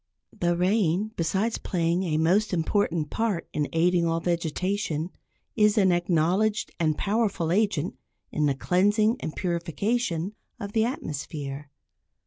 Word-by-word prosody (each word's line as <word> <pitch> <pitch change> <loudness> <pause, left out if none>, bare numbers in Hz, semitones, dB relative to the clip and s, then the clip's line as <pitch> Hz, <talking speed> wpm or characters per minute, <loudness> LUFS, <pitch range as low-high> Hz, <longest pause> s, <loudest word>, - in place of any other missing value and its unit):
The 175 0 0
rain, 190 +1 +1
besides 195 +7 0
playing 170 0 0
a 165 -5 0
most 185 +7 +2
important 165 -2 0
part 220 -6 -1
in 150 -1 -1
aiding 170 +1 +2
all 165 0 +1
vegetation, 170 0 -1 0.4
is 210 0 +4
an 190 -3 +5
acknowledged 175 +5 +1
and 155 -3 +1
powerful 200 -6 0
agent 200 -5 0 0.3
in 150 -1 +1
the 140 - +1
cleansing 205 - +2
and 155 - -5
purification 180 +2 -1 0.3
of 200 -3 -5
the 220 +1 +2
atmosphere. 145 - -5
180 Hz, 125 wpm, -26 LUFS, 165-205 Hz, 0.4 s, an